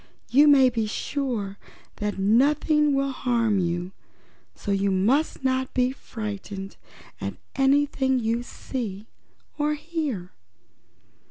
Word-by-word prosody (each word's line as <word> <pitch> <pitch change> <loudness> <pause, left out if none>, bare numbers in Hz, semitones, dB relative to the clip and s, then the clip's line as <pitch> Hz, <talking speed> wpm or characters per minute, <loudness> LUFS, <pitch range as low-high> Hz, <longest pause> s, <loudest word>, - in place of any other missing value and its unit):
You 285 +4 +6
may 270 -3 +6
be 225 -2 -1
sure 220 -5 -3 0.4
that 210 -1 -2
nothing 285 +8 +3
will 275 0 +1
harm 235 -5 +1
you, 175 +1 -1 0.6
so 205 - -4
you 200 0 +2
must 240 +11 +1
not 260 0 0
be 250 0 +3
frightened 205 -6 -6 0.5
at - - -3 0.2
anything 270 -1 +2
you 230 0 0
see 220 -5 -5 0.5
or 300 +1 +1
hear." 295 - -4
250 Hz, 110 wpm, -25 LUFS, 205-275 Hz, 0.6 s, You